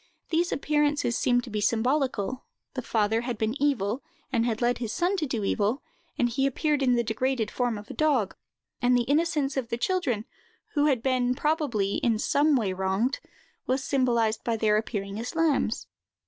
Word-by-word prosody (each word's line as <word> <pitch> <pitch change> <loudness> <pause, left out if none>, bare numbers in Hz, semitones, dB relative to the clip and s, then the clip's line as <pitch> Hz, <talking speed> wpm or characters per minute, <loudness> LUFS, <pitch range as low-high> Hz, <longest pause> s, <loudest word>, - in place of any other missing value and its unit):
These 340 +1 +1
appearances 295 -4 +1
seem 245 -1 +2
to 245 - -9
be 210 0 -1
symbolical: 250 +1 0 0.3
the 255 - -3
father 220 -1 +1
had 240 -1 -3
been 220 +1 0
evil, 250 -4 +1 0.3
and 235 -1 +2
had 225 -2 -1
led 240 0 +1
his 230 -3 -3
son 355 +9 +1
to 310 -4 -1
do 230 -5 -2
evil, 210 +6 0 0.3
and 245 - +3
he 270 +3 +1
appeared 295 +2 0
in 255 -2 +3
the 235 - +2
degraded 230 0 -1
form 245 -3 -1
of 205 0 -10
a - - -6
dog; 280 -10 +1 0.5
and 245 0 +4
the 245 - +2
innocence 290 0 +1
of 245 -3 -2
the 235 - -1
children, 245 - 0 0.5
who 295 -1 +3
had 255 -5 +1
been, 255 -1 +1
probably, 275 - 0
in 230 -3 +1
some 290 +6 +3
way 210 -7 +1
wronged, 190 +8 0 0.5
was 260 +1 0
symbolized 235 -6 +1
by 230 -1 0
their 215 -1 +3
appearing 205 -2 -2
as 240 +7 -5
lambs. 310 -8 +1
245 Hz, 185 wpm, -27 LUFS, 220-280 Hz, 0.5 s, and